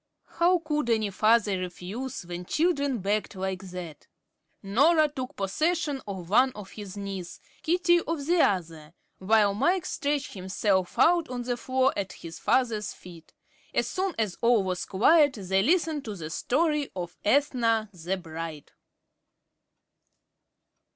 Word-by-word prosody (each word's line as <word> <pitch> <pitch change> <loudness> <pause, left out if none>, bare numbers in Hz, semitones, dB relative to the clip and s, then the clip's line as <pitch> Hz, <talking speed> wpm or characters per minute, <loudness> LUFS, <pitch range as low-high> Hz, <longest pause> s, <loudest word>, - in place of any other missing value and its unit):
How 355 +2 +5
could 300 -6 -2
any 220 -3 +1
father 215 -1 +3
refuse 185 +8 -5
when 175 +1 -6
children 285 - 0
begged 205 +2 -1
like 190 0 -3
that? 175 -4 -8 0.6
Norah 300 +11 +4
took 260 -3 -6
possession 295 - -1
of 190 -4 -6
one 250 +7 +4
of 205 -2 -10
his 205 -2 -9
knees, 195 -3 -6 0.2
Katie 345 +1 +3
of 320 -4 -2
the 345 +3 +2
other, 165 -4 -1 0.2
while 205 +1 +3
Mike 350 - +1
stretched 290 -1 -2
himself 190 +1 -1
out 335 +4 +4
on 245 -1 -4
the 245 0 -1
floor 260 +2 +1
at 195 -2 -3
his 165 -1 -10
father's 230 -5 +1
feet. 170 -3 -14 0.4
As - - +1
soon 380 -1 -2
as 215 -5 -2
all 235 -3 +4
was 185 -1 -2
quiet, 290 - +4
they 190 -2 0
listened 315 - +1
to 215 -2 -5
the 160 -4 -7
story 300 - 0
of 175 -2 -5
"Ethna, 230 -4 +2
the 180 +2 -3
Bride." 165 -3 -7
215 Hz, 140 wpm, -27 LUFS, 190-285 Hz, 0.6 s, How